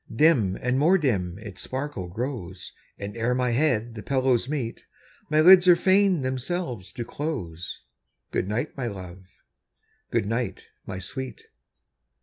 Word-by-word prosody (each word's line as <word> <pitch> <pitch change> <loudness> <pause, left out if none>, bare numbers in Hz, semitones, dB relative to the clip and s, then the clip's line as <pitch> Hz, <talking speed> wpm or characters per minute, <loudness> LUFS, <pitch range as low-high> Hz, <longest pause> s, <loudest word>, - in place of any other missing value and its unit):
Dim 115 - +4
and 125 +2 0
more 170 +6 +5
dim 95 - 0
its 105 -3 -8
sparkle 130 -8 -4
grows, 95 -3 -5 0.2
And 100 +1 -6
ere 115 +2 0
my 125 -1 +1
head 120 -3 +1
the 110 - -7
pillows 130 -1 +1
meet, 130 -6 -3 0.5
My 155 0 +4
lids 180 +2 +8
are 175 - +9
fain 190 -3 +3
themselves 130 - -3
to 120 - -5
close. 95 - -5 0.5
Good 95 - -1
night, 120 +8 -2
my 125 -3 -3
love! 95 -3 -8 0.8
good - - +1
night, 115 +3 -2 0.2
my 95 - -4
sweet! 125 +6 -6
125 Hz, 140 wpm, -26 LUFS, 100-145 Hz, 0.8 s, are